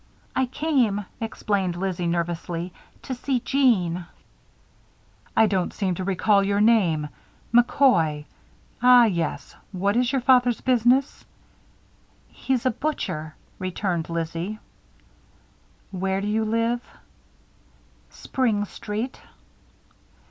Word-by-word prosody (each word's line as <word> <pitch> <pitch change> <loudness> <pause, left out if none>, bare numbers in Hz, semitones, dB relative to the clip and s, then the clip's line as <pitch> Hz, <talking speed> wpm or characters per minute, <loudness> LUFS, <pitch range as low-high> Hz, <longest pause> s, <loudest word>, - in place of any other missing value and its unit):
"I 260 - +1
came," 255 -8 0
explained 200 -5 -2
Lizzie, 180 -1 -2
nervously, 170 +1 -3 0.3
"to 260 - -4
see 255 +1 -1
Jeanne." 185 -11 +1 1.3
"I 220 - +7
don't 190 -4 0
seem 190 -3 -1
to 185 - -4
recall 200 +2 +2
your 200 +1 +1
name 190 -9 +3 0.5
McCoy. 235 - +3 0.6
Ah, 250 -1 +7
yes. 170 -7 -2 0.2
What 200 +2 0
is 245 +1 +2
your 270 -2 0
father's 245 -2 +4
business?" 255 +2 +2 1.1
"He's 260 -2 -2
a 255 - +3
butcher," 185 - -4 0.2
returned 185 -2 -2
Lizzie. 170 +5 -3 1.3
"Where 190 0 -1
do 200 - -4
you 220 +1 0
live?" 230 +2 0 1.3
"Spring 225 -6 -1
Street." 215 +5 -5
205 Hz, 100 wpm, -24 LUFS, 180-245 Hz, 1.3 s, I